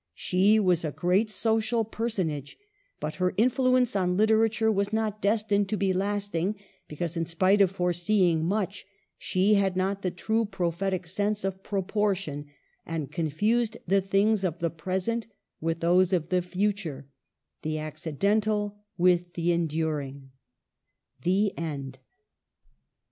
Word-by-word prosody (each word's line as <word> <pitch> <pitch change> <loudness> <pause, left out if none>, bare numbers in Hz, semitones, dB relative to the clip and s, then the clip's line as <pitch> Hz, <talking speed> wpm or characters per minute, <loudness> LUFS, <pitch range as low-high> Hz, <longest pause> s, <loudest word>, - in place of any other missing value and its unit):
She 200 +4 +3
was 180 -5 +2
a 155 - -2
great 185 +8 +1
social 225 +2 +1
personage, 185 - -3 0.4
but 150 0 -4
her 180 0 0
influence 255 +1 +3
on 180 -2 +1
literature 220 +1 +3
was 200 0 0
not 215 -1 -1
destined 205 -1 +1
to 215 - 0
be 190 0 +1
lasting, 200 -1 -1 0.3
because, 165 +2 -4
in 165 - 0
spite 185 +5 +3
of 195 - +5
foreseeing 180 -1 +1
much, 195 +2 -2 0.3
she 190 +3 +2
had 195 -2 +2
not 195 +1 0
the 185 - 0
true 220 +6 0
prophetie 185 -1 -2
sense 205 +3 -1
of 190 0 -3
proportion, 195 -7 -1 0.4
and 160 -4 -4
confused 210 +9 0
the 195 +2 +3
things 195 +2 +2
of 175 -3 -1
the 170 -1 -1
pres 185 +4 -3
ent 230 0 -1 0.3
with 165 +1 -2
those 180 +2 +3
of 170 -4 0
the 180 -1 +2
future 180 -6 -2 0.3
— - - -58
the 155 0 -2
accidental 200 +8 -1 0.2
with 175 -1 +2
the 170 0 0
enduring. 150 -5 -2 0.9
THE 195 +6 +1
END. 140 -5 -5
190 Hz, 140 wpm, -27 LUFS, 170-210 Hz, 0.9 s, of